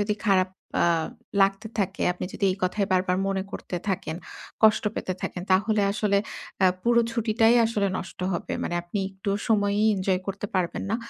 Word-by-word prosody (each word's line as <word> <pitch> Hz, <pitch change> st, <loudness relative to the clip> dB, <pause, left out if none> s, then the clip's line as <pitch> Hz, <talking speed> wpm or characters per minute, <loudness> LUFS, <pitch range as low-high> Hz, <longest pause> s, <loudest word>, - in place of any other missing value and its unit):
যদি 205 Hz, +1 st, +1 dB
খারাপ 185 Hz, -2 st, +4 dB, 0.4 s
আ -, -, +4 dB, 0.6 s
লাগতে 195 Hz, +2 st, +1 dB
থাকে, 195 Hz, -1 st, -1 dB
আপনি 180 Hz, -, -6 dB
যদি -, -, -2 dB
এই -, -, -6 dB
কথাই 195 Hz, +2 st, +1 dB
বারবার 185 Hz, 0 st, +2 dB
মনে 195 Hz, -1 st, 0 dB
করতে 180 Hz, -, -5 dB
থাকেন, 170 Hz, -4 st, -2 dB, 0.5 s
কষ্ট 220 Hz, 0 st, +5 dB
পেতে 185 Hz, -, -2 dB
থাকেন 180 Hz, -, -4 dB
তাহলে 205 Hz, +2 st, +3 dB
আসলে 200 Hz, -1 st, +2 dB, 0.5 s
আ -, -, +8 dB, 0.2 s
পুরো 235 Hz, 0 st, +4 dB
ছুটিটাই 225 Hz, 0 st, +3 dB
আসলে 210 Hz, -3 st, 0 dB
নষ্ট 185 Hz, -, -8 dB
হবে। 170 Hz, -, -3 dB
মানে 175 Hz, -, -2 dB
আপনি 175 Hz, +4 st, -4 dB
একটু 190 Hz, +1 st, -4 dB, 0.2 s
সময়ই 205 Hz, -1 st, +2 dB
এনজয় 190 Hz, -1 st, 0 dB
করতে 195 Hz, +1 st, -4 dB
পারবেন 180 Hz, -2 st, 0 dB
না। 225 Hz, -, +2 dB
195 Hz, 175 wpm, -26 LUFS, 185-215 Hz, 0.6 s, আ